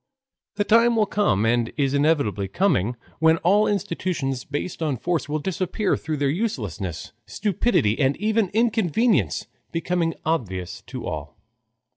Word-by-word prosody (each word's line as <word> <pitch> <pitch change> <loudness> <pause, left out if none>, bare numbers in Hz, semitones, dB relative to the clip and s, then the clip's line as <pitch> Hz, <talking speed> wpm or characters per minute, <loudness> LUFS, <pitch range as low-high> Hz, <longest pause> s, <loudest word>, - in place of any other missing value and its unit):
The 205 - +1
time 230 +3 +4
will 220 -1 +3
come 120 - +1
and 120 0 +1
is 140 -2 +1
inevitably 140 -9 +1
coming 120 - +1 0.2
when 160 +1 +5
all 205 +5 +4
institutions 170 -9 -2
based 145 +5 -4
on 150 -5 0
force 165 +1 -2
will 150 - 0
disappear 190 +5 -1
through 155 0 -4
their 145 0 +1
uselessness, 110 - -3 0.2
stupidity, 180 - +1
and 135 -1 +2
even 215 -1 +1
inconvenience 220 - +1 0.3
becoming 165 0 -1
obvious 95 - -2
to - - -6
all. - - -5
160 Hz, 135 wpm, -24 LUFS, 130-205 Hz, 0.3 s, when